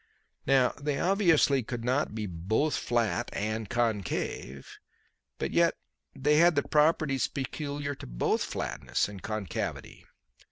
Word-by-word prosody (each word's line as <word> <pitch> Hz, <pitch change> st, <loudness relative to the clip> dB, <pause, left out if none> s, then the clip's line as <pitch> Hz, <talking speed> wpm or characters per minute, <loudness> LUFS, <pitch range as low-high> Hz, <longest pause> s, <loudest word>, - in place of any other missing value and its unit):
Now 130 Hz, -2 st, +5 dB
they 145 Hz, -1 st, -1 dB
obviously 170 Hz, -8 st, +3 dB
could 120 Hz, 0 st, -5 dB
not 130 Hz, -3 st, 0 dB
be 110 Hz, -1 st, -3 dB
both 100 Hz, -, 0 dB
flat 115 Hz, -6 st, 0 dB
and 110 Hz, 0 st, -3 dB
concave; 105 Hz, -, -2 dB, 0.7 s
but -, -, -3 dB
yet -, -, +3 dB, 0.4 s
they 150 Hz, +3 st, +2 dB
had 170 Hz, +1 st, +5 dB
the 145 Hz, -, +2 dB
properties 150 Hz, -3 st, +2 dB
peculiar 145 Hz, +1 st, -4 dB
to 135 Hz, -, -10 dB
both -, -, 0 dB
flatness -, -, -2 dB
and 100 Hz, -2 st, -9 dB
concavity. 110 Hz, -3 st, -4 dB
130 Hz, 125 wpm, -29 LUFS, 110-145 Hz, 0.7 s, Now